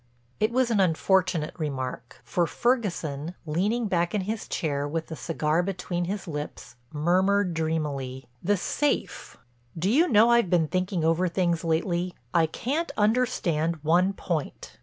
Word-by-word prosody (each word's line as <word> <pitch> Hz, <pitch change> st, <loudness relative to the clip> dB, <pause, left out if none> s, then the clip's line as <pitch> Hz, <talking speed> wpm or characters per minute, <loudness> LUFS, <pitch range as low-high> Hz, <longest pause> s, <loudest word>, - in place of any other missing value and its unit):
It 215 Hz, +2 st, +2 dB
was 250 Hz, -1 st, +2 dB
an 215 Hz, -, +2 dB
unfortunate 180 Hz, -2 st, +2 dB
remark, 130 Hz, -4 st, -4 dB
for 175 Hz, -2 st, 0 dB
Ferguson, 175 Hz, -, -1 dB
leaning 200 Hz, +10 st, 0 dB
back 175 Hz, 0 st, 0 dB
in 205 Hz, -, +1 dB
his 215 Hz, +3 st, -4 dB
chair 145 Hz, -3 st, -1 dB
with 160 Hz, +2 st, -3 dB
the 160 Hz, -, -5 dB
cigar 160 Hz, 0 st, 0 dB
between 180 Hz, -1 st, -3 dB
his 195 Hz, +1 st, -4 dB
lips, 150 Hz, -5 st, -6 dB, 0.2 s
murmured 185 Hz, +5 st, +2 dB
dreamily: 145 Hz, -5 st, -2 dB, 0.2 s
"The 205 Hz, +3 st, +2 dB
safe—do 160 Hz, -, -3 dB
you 320 Hz, +8 st, +4 dB
know 225 Hz, -2 st, +5 dB
I've 235 Hz, -6 st, +4 dB
been 170 Hz, -3 st, +3 dB
thinking 185 Hz, -2 st, -1 dB
over 165 Hz, +3 st, +2 dB
things 170 Hz, -1 st, 0 dB
lately. 170 Hz, +2 st, 0 dB, 0.2 s
I 165 Hz, -1 st, +4 dB
can't 285 Hz, -, -2 dB
understand 185 Hz, -8 st, +1 dB
one 180 Hz, +5 st, +3 dB
point. 170 Hz, -6 st, -4 dB
175 Hz, 140 wpm, -26 LUFS, 155-200 Hz, 0.2 s, know